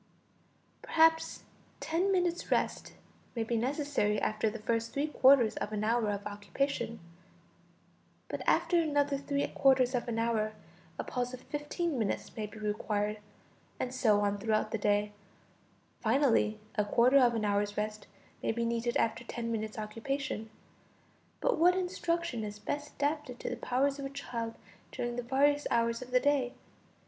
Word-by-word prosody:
Perhaps 325 0 +3 0.4
ten 355 +5 0
minutes' 355 -2 0
rest - - 0 0.4
may 230 - 0
be 235 +1 -1
necessary 260 -3 0
after 215 +1 0
the 220 - -6
first 230 +1 -1
three 280 +1 0
quarters 265 -6 +5
of 210 - -3
an 210 0 -2
hour 225 0 +2
of 205 0 -3
occupation; 225 +3 -2 1.3
but - - -4
after 345 -2 +3
another 285 -3 +1
three 280 0 -1
quarters 260 -2 +4
of 245 -1 -1
an 230 -1 -2
hour, 225 -2 0 0.4
a - - -2
pause 250 0 -3
of 250 - -14
fifteen 295 0 -3
minutes 215 -3 -2
may 215 -2 -3
be 210 - -12
required, 210 0 -1 0.6
and 255 - -2
so 215 -5 +3
on 205 0 0
throughout 215 0 0
the 225 - -1
day; 205 0 +1 0.9
finally, 230 -3 +3 0.2
a 210 - +1
quarter 240 +6 +5
of 240 -2 +4
an 215 -2 0
hour's 205 0 0
rest 215 0 -3 0.3
may - - 0
be 235 +1 -1
needed 235 +1 0
after 230 +1 0
ten 230 -1 -4
minutes' 220 -1 -3
occupation. 225 +2 -3 0.9
But - - +1
what 360 +2 +5
instruction 340 - -1
is 205 -1 -5
best 290 +7 -4
adapted 290 -3 -2
to - - -3
the - - -2
powers 275 +3 0
of 275 - -4
a - - -3
child 235 -5 -5 0.4
during 240 0 -3
the 245 - -2
various 285 +4 +2
hours 230 0 +1
of 250 - -8
the 250 0 +4
day? 275 -3 +1
240 Hz, 160 wpm, -31 LUFS, 215-280 Hz, 1.3 s, quarters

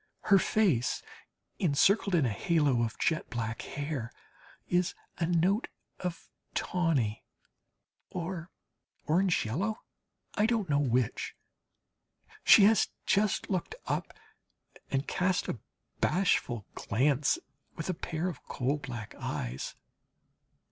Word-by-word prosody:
Her 200 - +5
little - - 0
face, 175 - +2 0.6
encircled 190 +3 +3
in 155 -5 +4
a 120 - +1
halo 145 - +2
of 115 0 -1
jet 160 -2 0
black 115 -1 -3
hair, 145 -5 -4 0.6
is 180 +1 +1 0.2
a 165 - +1
note 180 +6 +2 0.3
of 180 -2 -4 0.3
tawny 150 -12 0 0.9
or 175 -1 -4 0.6
orange 180 0 +2
yellow? 195 - -2 0.5
I 210 - +3
don't 225 -5 +1
know 140 - +4
which. 125 -4 0 1.1
She 205 - +8
has 210 0 +5 0.2
just 205 0 +1
looked 185 -3 -1
up - - -2 0.8
and 135 +1 -1
cast 180 0 +1
a 120 - -3 0.4
bashful 125 - +1
glance 135 +5 +2 0.4
with 165 - -5
a 185 - 0
pair 160 +1 -3
of 180 - -5
coal 135 +3 0
black 120 -6 -6
eyes. 60 +2 -4
160 Hz, 115 wpm, -30 LUFS, 125-185 Hz, 1.1 s, She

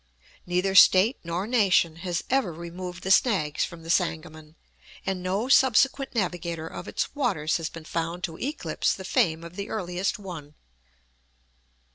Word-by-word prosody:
Neither 180 +2 0
State 190 +5 +6
nor 170 +3 -3
nation 190 -8 +2
has 175 0 -3
ever 260 -8 +1
removed 175 +2 -8
the 190 - -1
snags 190 - +3
from 170 -2 -6
the 165 - -2
Sangamon, 160 -3 -2 0.5
and 190 -1 -2
no 195 +6 -1
subsequent 270 0 +3
navigator 170 -5 -2
of - - -8
its - - -3
waters 190 - 0
has 165 -2 -4
been 165 -1 -11
found 165 +2 -3
to 165 -2 -3
eclipse 290 +4 -1
the 190 - -9
fame 165 -3 +1
of 170 +1 -10
the 200 - -5
earliest 185 -2 -2
one. 165 -7 -9
180 Hz, 150 wpm, -26 LUFS, 165-200 Hz, 0.5 s, State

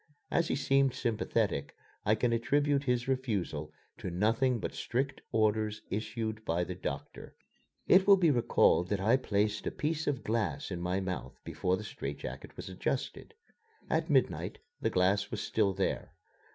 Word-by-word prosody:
As 170 -1 +2
he - - 0
seemed 135 -1 +2
sympathetic, 115 -2 -1 0.3
I 105 - +5
can 115 +1 +1
attribute 140 +4 +2
his 125 0 +1
refusal 100 - -1 0.3
to - - -4
nothing 115 +8 +2
but - - -4
strict 135 +4 -2
orders 110 -1 +1
issued 110 +1 -3
by 85 -2 0
the 90 - -4
doctor. 70 -6 -6 0.5
It 190 +1 +6
will 200 -1 +9
be 170 -4 +4
recalled 115 -7 +3
that 105 - 0
I 110 +6 +4
placed 105 -4 0
a - - 0
piece 160 +1 -2
of 140 -4 -1
glass 110 -2 -1
in 90 -2 -3
my 90 +2 0
mouth 95 -1 -4
before 90 0 0
the 110 - -7
strait 70 -9 -5
jacket - - -8
was - - -7
adjusted. - - -3 0.6
At - - +1
midnight - - +1 0.2
the - - +2
glass 100 +2 +2
was - - -3
still 105 -3 +1
there. 95 -4 -2
110 Hz, 165 wpm, -31 LUFS, 95-130 Hz, 0.6 s, will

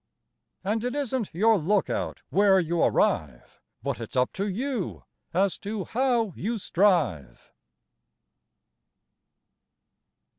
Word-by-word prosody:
And 215 +3 -1
it 250 +2 -2
isn't 260 -6 -1
your 215 +5 +3
lookout 195 +5 -1
where 195 -1 +5
you 170 -1 0
arrive, 65 -6 0 0.2
But 140 -3 -2
it's 115 +2 -7
up 125 0 +1
to 200 +2 -2
you 235 +1 -3 0.3
as 190 +2 +1
to 205 -1 -4
how 240 -5 +1
you 230 +4 -2
strive. 170 - 0
200 Hz, 105 wpm, -26 LUFS, 170-225 Hz, 0.3 s, where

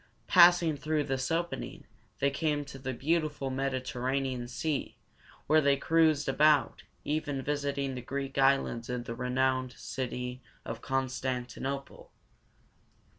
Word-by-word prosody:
Passing 175 -3 +6
through 150 +1 0
this 135 -1 -2
opening, 170 +1 -3 0.3
they 140 0 +1
came 145 0 -1
to 140 -1 -10
the 130 0 -3
beautiful 145 0 -1
Med 135 0 -1
i - - +1
ter 130 -1 -6
ra´ne 135 +1 0
an 120 -1 -5
Sea, 145 +4 -3 0.5
where 155 0 +5
they 140 -1 +3
cruised 155 -1 +3
about, 150 +2 +3 0.2
even 145 -3 -2
visiting 140 -1 -1
the 125 - -5
Greek 135 +2 -4
islands 135 -3 +2
and 125 -1 -3
the 115 - -4
renowned 130 +1 0
city 125 -1 -5 0.2
of 115 0 -6
Con 135 -1 0
stan 130 -1 -2
ti - - -12
no´ple. 140 +1 -5
135 Hz, 150 wpm, -30 LUFS, 130-150 Hz, 0.5 s, Passing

